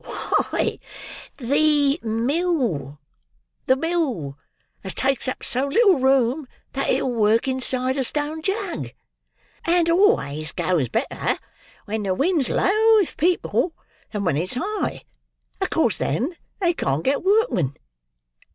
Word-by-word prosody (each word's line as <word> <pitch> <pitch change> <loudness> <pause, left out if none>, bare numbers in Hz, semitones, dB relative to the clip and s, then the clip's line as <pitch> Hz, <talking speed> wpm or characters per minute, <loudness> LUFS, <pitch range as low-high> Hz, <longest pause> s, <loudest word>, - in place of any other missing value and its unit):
Why, - - -1 0.6
the 285 +3 +2
mill—the 170 - -2
mill 265 - -2 0.5
as 190 - -6
takes 270 0 0
up 255 - -4
so 260 +3 0
little 380 - +4
room 265 +1 +2 0.3
that 275 - -1
it'll 255 - +1
work 225 +2 +2
inside 260 0 -1
a 270 - +1
Stone 300 +4 -2
Jug; 390 0 -3 0.7
and 335 0 +3
always 155 - +2
goes 165 -10 0
better - - -1 0.5
when 215 +1 -3
the 190 -2 -1
wind's 305 - +1
low 440 +3 +4
with 405 -6 +2
people, 345 0 +1 0.4
than 210 -2 -3
when 160 -5 +1
it's 180 +9 -1
high; 390 - -3 0.6
acos - - +1
then 255 - -1 0.2
they 350 -3 +2
can't 140 - -1
get 275 +2 +1
workmen. 385 - +2
265 Hz, 120 wpm, -23 LUFS, -, 0.7 s, little